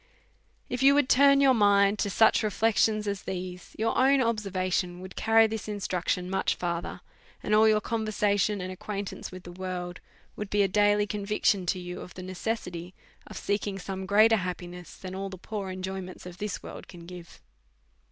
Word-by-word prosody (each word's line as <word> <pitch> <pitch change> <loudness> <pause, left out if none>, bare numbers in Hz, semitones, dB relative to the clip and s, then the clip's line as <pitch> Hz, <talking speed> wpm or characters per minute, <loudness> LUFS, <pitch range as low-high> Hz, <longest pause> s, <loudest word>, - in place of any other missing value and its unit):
If 250 - -3
you 275 +1 +6
would 290 -3 +3
turn 280 +1 +6
your 270 -1 +6
mind 205 -2 +4
to 205 - 0
such 220 +3 +4
reflections 215 0 +1
as 200 -2 -2
these, 180 -1 -6
your 225 +1 0
own 270 +2 +4
observation 185 -6 -1
would 185 0 -10
carry 225 0 +5
this 220 -1 -4
instruc 200 -4 -3
tion 180 0 0
much 190 +1 0
further, 170 -1 -4 0.4
and 210 - -1
all 215 +1 +6
your 215 -1 +4
conversation 210 -2 0
and 185 0 -4
ac 185 - -8
quaintance 200 0 -5
with 185 -1 -10
the 175 - -9
world 180 -1 -5 0.4
would 210 -1 -5
be 205 0 +3
a - - +3
daily 205 +1 +3
conviction 205 -2 0
to 185 - +1
you 180 0 -6
of - - -11
the 185 - -7
necessity 180 -2 -4 0.3
of - - -9
seeking 200 -1 -2
some 190 0 -5
greater 220 +3 +5
happi 180 -2 -4
ness, 180 -1 -11
than 185 -1 -8
all 195 +1 -4
the 190 - -8
poor 200 +1 -5
enjoyments 185 0 -6
this 180 +3 -6
world - - -9
can 175 -2 -12
give. 175 -1 -11
200 Hz, 185 wpm, -28 LUFS, 180-215 Hz, 0.4 s, you